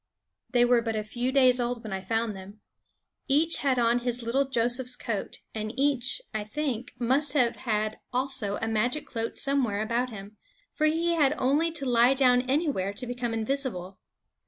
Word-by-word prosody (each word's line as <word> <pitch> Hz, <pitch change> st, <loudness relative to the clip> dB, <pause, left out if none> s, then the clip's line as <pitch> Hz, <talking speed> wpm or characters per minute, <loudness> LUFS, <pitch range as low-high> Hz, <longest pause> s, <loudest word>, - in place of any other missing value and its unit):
They 245 Hz, 0 st, +4 dB
were 245 Hz, -1 st, +4 dB
but 225 Hz, -1 st, -3 dB
a 215 Hz, -, -1 dB
few 240 Hz, +4 st, -3 dB
days 255 Hz, -2 st, +5 dB
old 240 Hz, 0 st, -2 dB
when 215 Hz, -3 st, -6 dB
I 190 Hz, -, -3 dB
found 225 Hz, +2 st, -1 dB
them. 195 Hz, +2 st, -11 dB, 0.7 s
Each 310 Hz, +4 st, +3 dB
had 270 Hz, -2 st, +1 dB
on 235 Hz, 0 st, +3 dB
his 245 Hz, 0 st, -3 dB
little 260 Hz, +5 st, +1 dB
Joseph's 250 Hz, 0 st, 0 dB
coat; 230 Hz, -5 st, -5 dB
and 215 Hz, -1 st, -4 dB
each, 275 Hz, -, +1 dB
I 215 Hz, -1 st, -2 dB
think, 250 Hz, 0 st, -4 dB
must 260 Hz, +4 st, +1 dB
have 245 Hz, -5 st, +2 dB
had 215 Hz, -2 st, -2 dB
also 255 Hz, -5 st, -1 dB
a -, -, 0 dB
magic 235 Hz, +6 st, 0 dB
cloak 230 Hz, -2 st, -4 dB
somewhere 265 Hz, -7 st, +1 dB
about 235 Hz, +3 st, -1 dB
him; 210 Hz, -1 st, -10 dB, 0.4 s
for 310 Hz, -, +2 dB
he 330 Hz, +2 st, +1 dB
had 300 Hz, -4 st, +2 dB
only 295 Hz, +6 st, +1 dB
to 280 Hz, -4 st, -4 dB
lie 245 Hz, +1 st, +4 dB
down 250 Hz, -2 st, +4 dB
anywhere 270 Hz, -, 0 dB
to 250 Hz, +5 st, -2 dB
become 245 Hz, -1 st, -3 dB
invisible. 220 Hz, -6 st, -2 dB
245 Hz, 180 wpm, -27 LUFS, 220-270 Hz, 0.7 s, days